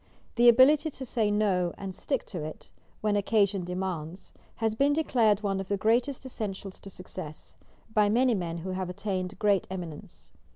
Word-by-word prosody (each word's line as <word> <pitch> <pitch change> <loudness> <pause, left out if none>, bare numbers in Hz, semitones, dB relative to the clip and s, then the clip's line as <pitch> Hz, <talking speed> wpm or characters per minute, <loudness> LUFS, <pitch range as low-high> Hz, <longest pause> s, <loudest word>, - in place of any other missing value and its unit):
The 240 +1 +6
ability 280 +6 +6
to 270 -2 -8
say 225 -4 +1
"No" 195 -4 +1
and 195 -1 -6
stick 270 +7 -2
to 175 -7 -6
it, 155 0 -8 0.3
when 210 -1 +1
occasion 200 -2 +2
demands, 180 -1 -5 0.2
has 225 -1 0
been 280 +6 +3
declared 230 -9 +2
one 195 -1 0
of 195 - -5
the 200 - 0
greatest 240 +6 +1
essentials 200 -6 -5
to 195 - -11
success, 180 -4 -9 0.4
by 210 -2 +4
many 245 +3 +3
men 170 -5 -2
who 180 +3 -5
have 185 -1 -3
attained 185 0 -3
great 200 -2 +2
eminence. 175 -5 -8
200 Hz, 170 wpm, -28 LUFS, 185-225 Hz, 0.4 s, The